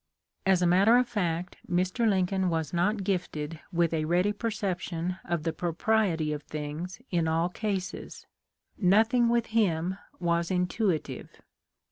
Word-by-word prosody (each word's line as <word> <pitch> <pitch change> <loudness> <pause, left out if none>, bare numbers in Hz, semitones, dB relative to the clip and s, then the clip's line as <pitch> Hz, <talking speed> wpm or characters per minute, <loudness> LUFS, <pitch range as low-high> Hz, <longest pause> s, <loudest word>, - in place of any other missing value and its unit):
As 185 -2 +4
a - - +4
matter 195 +7 +5
of 250 -1 +2
fact 180 -6 -2
Mr. 185 +6 +1
Lincoln 190 -1 +1
was 160 -2 -2
not 195 +4 +1
gifted 165 -5 -2
with 170 -2 +1
a 155 -1 0
ready 180 +5 +2
perception 185 -5 -3
of 170 -3 -2
the 165 -1 -1
propriety 170 -2 +1
of 150 - -4
things 155 +7 -6
in 170 -3 +1
all 165 +2 +1
cases. 190 -1 -4 0.5
Nothing 225 +5 +4
with 235 -1 +2
him 185 -4 +1 0.2
was 170 -1 0
intuitive. 180 -2 -1
180 Hz, 135 wpm, -28 LUFS, 165-205 Hz, 0.5 s, matter